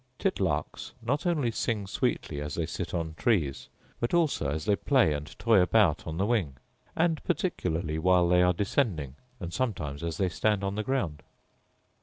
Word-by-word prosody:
Titlarks 95 - -1
not 140 +9 0
only 150 -9 +1
sing 110 -2 -1
sweetly 75 -5 -2
as 75 0 -4
they 85 - -1
sit 85 +2 -5
on 80 -2 -3
trees, 80 - 0 0.3
but 120 +8 0
also 155 - +1
as 75 +2 -3
they 105 -1 +3
play 125 - +3
and 75 0 -6
toy 115 -4 +4
about 90 -4 +3
on 80 0 -4
the 95 - +1
wing; 100 - 0 0.4
and 165 -2 +1
particularly 80 - -1
while 90 +1 +4
they 90 +1 +4
are 90 0 +5
descending, 90 - -1 0.2
and 85 -2 -6
sometimes 85 - -2
as 85 -1 -3
they 95 - +1
stand 100 +5 0
on 100 0 -1
the 105 - -2
ground. 100 - -2
90 Hz, 175 wpm, -28 LUFS, 80-115 Hz, 0.4 s, are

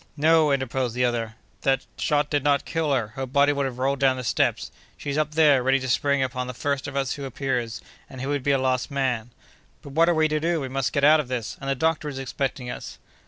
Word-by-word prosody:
"No!" 155 0 +4
interposed 130 -3 -1
the 125 0 +2
other, 115 -2 -2 0.3
"that 135 -1 +1
shot 150 0 0
did 145 -2 +1
not 145 -1 +2
kill 160 -3 -1
her; 120 -6 0
her 135 +4 -5
body 140 +3 +3
would 140 -1 0
have 125 -2 -7
rolled 135 +1 0
down 135 -2 +3
the 125 - -5
steps; 110 - 0 0.3
she's 140 -1 -4
up 155 0 0
there, 150 -5 +5
ready 135 +2 +2
to 130 - -5
spring 140 +2 +2
upon 125 -1 -3
the 125 - -6
first 140 +1 -2
of 145 - -7
us 135 -2 0
who 140 - -6
appears, 125 -3 -3 0.3
and 130 - -10
he 130 - -4
would 145 0 -1
be 140 - -2
a 140 - +4
lost 130 0 0
man!" 130 -5 -1 0.5
"But 140 - -10
what 165 +4 +4
are 175 - +3
we 155 0 +3
to 155 0 0
do? 165 +1 0
We 135 -3 -4
must 135 -1 -1
get 140 - -1
out 155 +2 +7
of 150 - -2
this, 125 -3 -4
and 135 - -4
the 135 - +1
doctor 155 +1 0
is 140 - -7
expecting 135 -1 -3
us." 120 - -7
135 Hz, 255 wpm, -24 LUFS, 130-145 Hz, 0.5 s, out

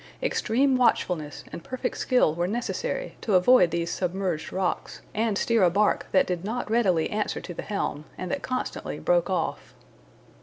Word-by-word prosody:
Extreme 265 - +2
watchfulness 175 -11 +1
and 170 - -7
perfect 255 0 -3
skill 250 -11 +2
were 175 +2 -1
necessary 365 - -3
to 210 - +1
avoid 185 0 +6
these 170 0 -2
submerged 180 -3 -2
rocks, 185 -1 -2
and 215 -2 0
steer 230 0 +2
a 180 - +6
bark 205 +4 +1
that 190 - +4
did 180 -1 -3
not 220 +2 -3
readily 190 -9 +2
answer 210 0 -1
to 175 - -8
the - - -5
helm, 155 -7 -3
and 185 - -4
that 280 - -2
constantly 255 0 -3
broke - - +1
off. - - -2
205 Hz, 165 wpm, -26 LUFS, 175-245 Hz, -, avoid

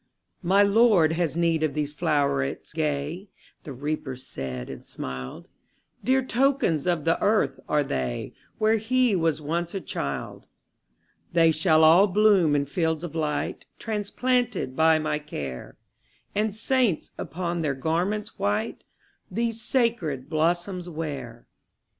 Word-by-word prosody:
``My 195 +3 +4
Lord 200 -6 +5
has 165 -1 -1
need 165 -2 +2
of 155 -2 0
these 150 -1 -2
flowerets 145 - 0
gay,'' 155 +4 -2 0.3
The 155 - -9
Reaper 145 0 -4
said, 65 - -6
and - - -8
smiled; 65 0 -7 0.6
``Dear 260 0 +2
tokens 250 - +1
of 170 -4 0
the 165 - +2
earth 200 -11 +2
are 150 -1 +3
they, 65 - -3 0.2
Where 220 +1 +3
he 240 0 +2
was 160 -3 0
once 170 +4 -2
a - - -1
child. 70 - -5 0.9
``They 165 -1 +5
shall 160 0 +4
all 170 +6 +7
bloom 195 -6 +4
in 140 -1 +1
fields 160 +2 -1
of 170 -4 -5
light, 155 -2 -2
Transplanted 220 - -1
by 160 +1 +5
my 155 -1 -1
care, 70 - -7 0.6
And 210 0 0
saints, 230 -5 +1
upon 170 +2 -3
their 145 -4 0
garments 180 +10 -2
white, 210 +3 -1 0.5
These 230 +3 -1
sacred 185 - 0
blossoms 175 +3 0
wear.'' 140 -8 -6
165 Hz, 130 wpm, -26 LUFS, 150-205 Hz, 0.9 s, all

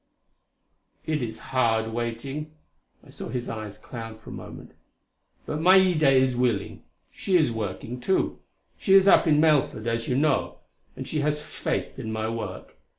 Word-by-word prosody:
"It 155 -2 -1
is 110 -2 -4 0.2
hard 115 -3 +1
waiting," 135 +6 -4 0.5
I - - -15
saw - - -7
his 125 -2 -4
eyes 110 -2 -6
cloud 115 -2 -8
for 110 - -12
a - - -6
moment - - -10 0.7
"but 150 +1 -3
Maida 180 -4 +5
is 130 -1 +3
willing. 120 -5 -1 0.3
She 185 -2 +1
is 155 -7 +2
working, 110 +2 -5
too 190 +10 0 0.4
she 195 - +4
is 195 0 +6
up 190 - +6
in 150 -1 +4
Melford 150 -8 +2
as 115 0 -1
you 125 - 0
know 135 - +1 0.4
and 130 - -7
she 155 - -2
has 150 +1 0
faith - - -4
in 110 - -4
my 110 0 -2
work. 115 0 -6
125 Hz, 160 wpm, -26 LUFS, 115-150 Hz, 0.7 s, is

